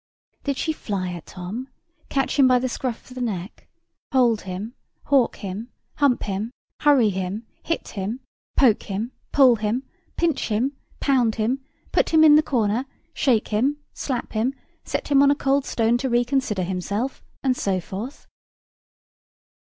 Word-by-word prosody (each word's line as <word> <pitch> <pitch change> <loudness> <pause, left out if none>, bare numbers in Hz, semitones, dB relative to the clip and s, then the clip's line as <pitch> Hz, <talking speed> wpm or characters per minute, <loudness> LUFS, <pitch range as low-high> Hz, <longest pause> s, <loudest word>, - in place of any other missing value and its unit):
Did 280 -2 -1
she 315 - 0
fly 195 -10 -3
at 170 - -9
Tom, 195 +8 -6 0.4
catch 270 +1 0
him 270 - +8
by 255 0 +5
the 255 +1 0
scruff 245 -1 -4
of 255 - -11
the 255 - -6
neck, 200 -5 -4 0.4
hold 240 -5 +3
him, 200 +6 -5 0.4
howk 270 -4 +4
him, 205 +4 -6 0.3
hump 280 -4 +3
him, 205 +2 -2 0.3
hurry 275 -7 +5
him, 190 +4 -3 0.2
hit 330 - -2
him, 210 +4 -4 0.4
poke 240 -6 +5
him, 215 +4 -4 0.2
pull 260 -4 +6
him, 215 +5 -1 0.3
pinch 330 -5 +1
him, 240 +6 0 0.2
pound 250 -6 +2
him, 245 +5 0 0.3
put - - +2
him 315 -1 +6
in 305 -1 +8
the 305 - +7
corner, 240 -3 0 0.3
shake 240 -6 +2
him, 255 +8 +1 0.2
slap 255 -4 -3
him, 235 +5 0 0.3
set - - -3
him 280 -1 +6
on 280 - +6
a 285 - +4
cold 275 -1 +1
stone 230 +1 +2
to 265 - -1
reconsider 240 -4 +1
himself, 200 +8 -2 0.2
and 260 -2 +2
so 195 -5 0
forth? 205 - -7
240 Hz, 160 wpm, -24 LUFS, 210-270 Hz, 0.4 s, him